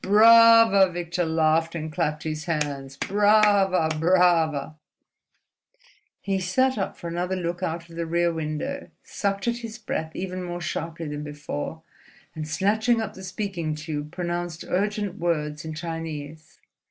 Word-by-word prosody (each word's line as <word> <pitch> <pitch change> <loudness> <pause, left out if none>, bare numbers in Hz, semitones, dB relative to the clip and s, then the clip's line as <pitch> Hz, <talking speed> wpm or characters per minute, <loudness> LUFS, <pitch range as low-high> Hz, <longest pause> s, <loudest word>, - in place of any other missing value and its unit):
"Brava!" 225 -1 +7
Victor 175 0 -2
laughed, 160 +1 +2
and 155 -1 -5
clapped 150 0 -1
his 155 0 -4
hands. 145 -5 -3
"Brava! 205 -3 +3
brava!" 165 -4 +3 1.4
He 195 -1 -1
sat 260 +9 +1
up 195 - -3
for 170 - -7
another 175 +2 -2
look 175 -1 -3
out 170 -1 -3
of 165 - -13
the 170 0 -3
rear 170 +1 +1
window, 160 - -4
sucked 200 +1 -2
at 235 0 +1
his 230 -1 -7
breath 160 -7 -4
even 185 0 -4
more 175 0 -5
sharply 165 -1 -4
than 145 0 -5
before, 145 - -6 0.5
and 155 -1 -5
snatching 220 +8 +1
up 215 -2 -3
the 190 - -11
speaking 185 -5 -3
tube 150 -1 -5
pronounced 175 -2 -4
urgent 205 +1 -1
words 150 -3 -1
in 160 -1 -6
Chinese. 155 -2 -6
175 Hz, 140 wpm, -25 LUFS, 155-195 Hz, 1.4 s, Brava